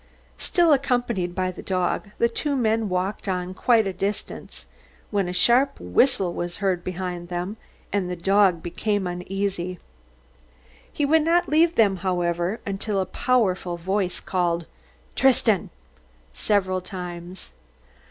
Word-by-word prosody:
Still 340 -4 +3
accompanied 245 -10 0
by 185 -1 0
the 185 - -9
dog, 185 +2 -1
the 235 - +3
two 280 +5 -1
men 225 -4 +1
walked 185 +3 -2
on 180 -1 -2
quite 225 +3 +3
a 195 - -2
distance, 200 +3 -5 0.5
when 200 -3 +1
a - - -2
sharp 240 +9 +3
whistle 185 - +2
was 175 0 -4
heard 190 -4 0
behind 180 -1 -4
them, 180 +3 -3 0.4
and 195 -3 0
the 180 - -2
dog 190 -1 +3
became 205 +3 -1
uneasy. 180 0 -3 1.1
He 290 - 0
would 315 +3 +4
not 345 +3 +2
leave 325 +3 +4
them, 200 -6 +4
however, 175 +2 -1
until 200 +1 -1
a 190 - +1
powerful 185 -7 0
voice 190 +1 -1
called 175 -2 -1 0.5
"Tristan!" 235 -7 +3 0.6
several 185 - +1
times. 180 -1 -8
190 Hz, 135 wpm, -24 LUFS, 180-225 Hz, 1.1 s, would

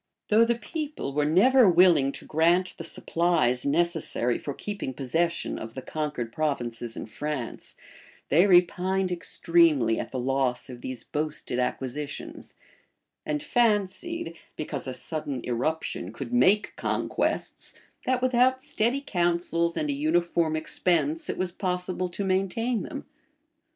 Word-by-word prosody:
Though 220 +2 +6
the 235 +1 +1
people 295 - -5
were 150 +1 +1
never 230 - +6
willing 170 -6 +5
to - - -8
grant 170 +4 +2
the - - -7
supplies 160 -8 0
necessary 160 -6 +1
for 145 - -5
keeping 200 -11 -5
possession 165 +6 -1
of 110 +1 -8
the 130 - -6
conquered 145 -7 -4
provinces 120 -6 -2
in - - -5
France, 135 +1 -5 0.5
they 170 +8 +5
repined 185 +1 +3
extremely 165 -8 +2
at - - -4
the 130 - -5
loss 130 -1 -1
of 120 -1 -10
these 130 -3 -6
boasted 150 -4 -3
acquisitions; 135 +3 -4 0.7
and 300 -1 -1
fancied, 230 - 0 0.2
because 150 - -4
a 130 - -3
sudden 145 -2 -2
irruption 125 - -2
could 235 - -7
make 210 -4 +3
conquests, - - -2 0.3
that, 255 0 +1
without 255 +1 +3
steady 240 +5 0
counsels 170 -5 0
and 300 -2 0
a - - 0
uniform 175 - +1
expense, 160 -1 0
it - - -2
was 185 -1 -1
possible 180 0 -2
to 190 +3 -4
maintain 195 +5 0
them. - - -7
170 Hz, 135 wpm, -27 LUFS, 140-200 Hz, 0.7 s, Though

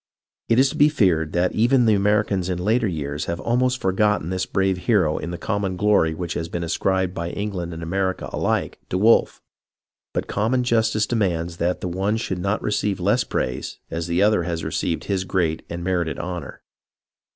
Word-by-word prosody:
It 115 - +4
is 130 +1 +5
to - - -7
be 145 +1 +6
feared 90 - +2
that 90 +1 +2
even 120 +3 +3
the 110 - +5
Americans 100 -2 +1
in 90 - -1
later 110 +6 +1
years 75 -4 -3
have 85 - -2
ahnost 125 +2 +1
forgotten 95 -4 +1
this 95 0 -1
brave 95 -1 0
hero 90 -9 +3
in 85 - -5
the 85 - -4
common 100 -2 -2
glor}' 100 -6 +3
which 85 0 -4
has 85 0 -4
been 85 0 -3
ascribed 95 +2 0
by 85 -2 -3
England 95 -3 -4
and 85 0 -7
America 95 +2 -1
aUke - - -1
to 90 - 0
Wolfe; 110 +4 +3 0.7
but - - -2
common 115 +5 0
justice 115 -2 +2
demands 85 -7 -1
that 90 +2 -1
the - - -2
one 95 +5 0
should 95 -4 -3
not 100 +4 -1
receive 105 -2 0
less 105 +7 +2
praise, 65 0 -3
as 85 0 -3
the 85 +3 +2
other 105 -3 +4
has 85 -1 -3
received 85 - -2
his 95 -2 -1
great 85 -4 -1
and 85 0 -5
merited 85 -3 -1
honor. 85 -5 -6
95 Hz, 190 wpm, -23 LUFS, 85-105 Hz, 0.7 s, be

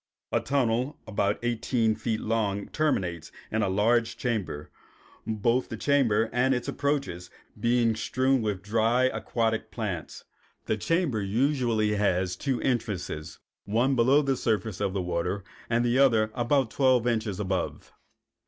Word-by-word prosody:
A - - +2
tunnel 130 0 0
about 100 -1 0
eighteen 115 -1 +1
feet 110 0 -2
long 105 -3 -1
terminates 90 - -1 0.2
in 110 - 0
a 100 - +1
large 115 +4 +2
chamber, 100 -11 -3 0.6
both 115 +3 +1
the - - -5
chamber 120 -6 +2
and 130 +2 +3
its 125 - -4
approaches 140 -12 -2 0.3
being 115 -1 +2
strewn 130 +3 +1
with 105 -3 -2
dry 115 +4 +2
aquatic 115 -3 0
plants. 95 -9 -5 0.4
The - - 0
chamber 145 - 0
usually 115 -1 +1
has 90 -3 +1
two 130 +5 -2
entrances, 100 -11 -2 0.3
one 120 +6 +2
below 130 +5 +4
the 135 -1 +1
surface 110 -5 -1
of 100 -2 0
the 95 -2 -1
water, 90 +3 -2 0.3
and 120 +1 +2
the 120 +2 +2
other 115 -6 +4
about 125 0 +1
twelve 130 -4 +3
inches 110 -5 -1
above. 95 -2 -3
115 Hz, 140 wpm, -27 LUFS, 100-125 Hz, 0.6 s, below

